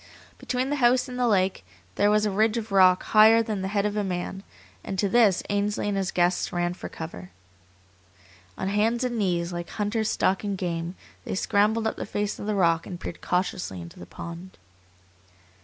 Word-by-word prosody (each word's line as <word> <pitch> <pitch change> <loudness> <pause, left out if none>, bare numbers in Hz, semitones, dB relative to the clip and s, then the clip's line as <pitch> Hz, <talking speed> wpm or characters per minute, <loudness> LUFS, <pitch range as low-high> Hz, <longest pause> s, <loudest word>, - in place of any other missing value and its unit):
Between 255 +1 -2
the 290 - 0
house 250 0 +3
and 250 0 -6
the 245 - +2
lake 190 - +1 0.3
there 205 - +2
was 210 0 +3
a 210 - 0
ridge 215 +3 +2
of 225 -2 -5
rock 185 -2 +5
higher 220 +1 +6
than 215 -3 -3
the 190 - -2
head 200 0 0
of 210 0 -1
a 210 - 0
man, 185 0 -4 0.4
and 190 - -5
to 200 - +2
this 205 -3 +3
Ainsley 205 0 -1
and 205 - -1
his 195 -1 -1
guests 175 0 +1
ran 175 0 -1
for - - -8
cover. 125 - -8 1.3
On - - -3
hands 220 +5 +1
and 240 -2 -1
knees, 175 -3 0
like 175 -1 -5
hunters 215 +1 -1
stalking 195 +1 0
game, 170 -1 -3 0.3
they - - -4
scrambled 215 +3 +1
up 220 - -1
the - - -5
face 205 0 -2
of 205 - -6
the 210 - 0
rock 165 -3 +2
and 175 -2 -7
peered 170 - -7
cautiously 180 - -2
into 85 0 -11
the 85 - -10
pond. 170 - -9
200 Hz, 195 wpm, -26 LUFS, 180-215 Hz, 1.3 s, higher